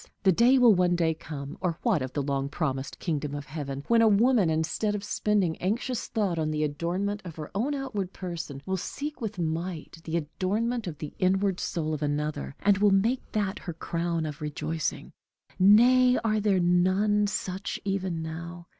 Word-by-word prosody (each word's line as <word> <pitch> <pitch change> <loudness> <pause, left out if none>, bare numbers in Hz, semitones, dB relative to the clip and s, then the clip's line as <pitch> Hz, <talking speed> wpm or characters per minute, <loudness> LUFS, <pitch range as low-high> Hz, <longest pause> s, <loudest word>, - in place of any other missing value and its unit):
The 190 - +6
day 240 +9 +5
will 245 -4 +7
one 180 -1 +3
day 165 -2 +2
come 145 -2 -8
or 175 -3 -1
what 215 - +2
of 130 0 -4
the 145 - -1
long 140 0 -1
promised 135 -3 -3
kingdom 150 -4 -2
of 145 -1 -5
heaven? 140 -2 -5
when 230 -1 +5
a 225 - +6
woman, 215 -2 +4
instead 160 +7 0
of 200 - -4
spending 205 -5 +1
anxious 230 +6 -1
thought 200 -7 -1
on 155 -1 0
the 155 0 0
adornment 175 +8 -2
of 170 -4 -8
her 155 -2 -7
own 250 +9 0
outward 210 -9 -3
person, 165 -8 -6
will 190 0 -1
seek 290 - -5
with 215 -3 -4
might 165 0 -4
the 165 +1 -1
adornment 205 +8 -1
of 155 -4 -5
the 150 - -7
inward 190 0 +2
soul 155 -2 -2
of 150 - -3
another, 145 - -2
and 200 -1 +3
will 205 0 +5
make 215 +7 +2
that 205 -1 -1
her 175 - -6
crown 170 0 -2
of 150 -1 -6
rejoicing. 150 +1 -3 0.5
Nay, 250 +6 +6
are 215 -1 +2
there 200 -3 +2
none 185 +4 +3
such 190 -1 -3
even 190 -4 -1
now? 170 +2 -7
180 Hz, 185 wpm, -27 LUFS, 155-210 Hz, 0.5 s, will